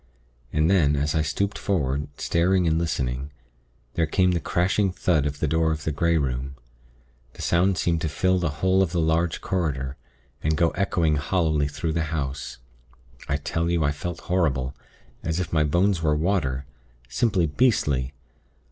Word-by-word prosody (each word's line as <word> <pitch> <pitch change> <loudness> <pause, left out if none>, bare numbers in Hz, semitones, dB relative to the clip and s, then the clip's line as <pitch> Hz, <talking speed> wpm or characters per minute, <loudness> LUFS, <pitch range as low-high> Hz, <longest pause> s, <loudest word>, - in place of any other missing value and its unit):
And 75 +1 +2
then, 80 -6 +4
as 75 +1 0
I 80 - +2
stooped 100 +7 -1
forward, 75 -7 -1
staring 90 +3 +2
and 80 0 +2
listening, 70 -5 -2 0.6
there 80 -2 +1
came 90 +3 +2
the 85 - +1
crashing 95 +4 +1
thud 80 -5 +1
of 75 0 -5
the 80 - 0
door 80 +2 +2
of 80 -1 -3
the 80 - -1
Grey 85 +3 +2
Room. 65 -1 -2 0.8
The - - -8
sound 90 +2 +2
seemed 85 -1 0
to 80 - -1
fill 95 +4 +1
the 85 -3 0 0.2
whole 95 +1 +4
of 90 -3 0
the 85 - +1
large 80 +1 +1
corridor, 70 -7 -2 0.4
and 80 +1 0
go 85 -1 +3
echoing 85 -5 +1
hollowly 75 -1 +1
through 80 +3 -3
the 80 -1 0
house. 70 -5 -4 0.7
I 70 - +1
tell 80 +3 -2
you, 85 -2 +1
I 70 - +2
felt 85 +3 -5
horrible 70 -8 0 0.5
as 80 +1 -2
if 90 - -4
my 80 -2 +3
bones 85 +4 +2
were 75 -2 +2
water. 75 -6 0 0.4
Simply 90 - +1
beastly. 75 - +1
80 Hz, 170 wpm, -25 LUFS, 75-90 Hz, 0.8 s, then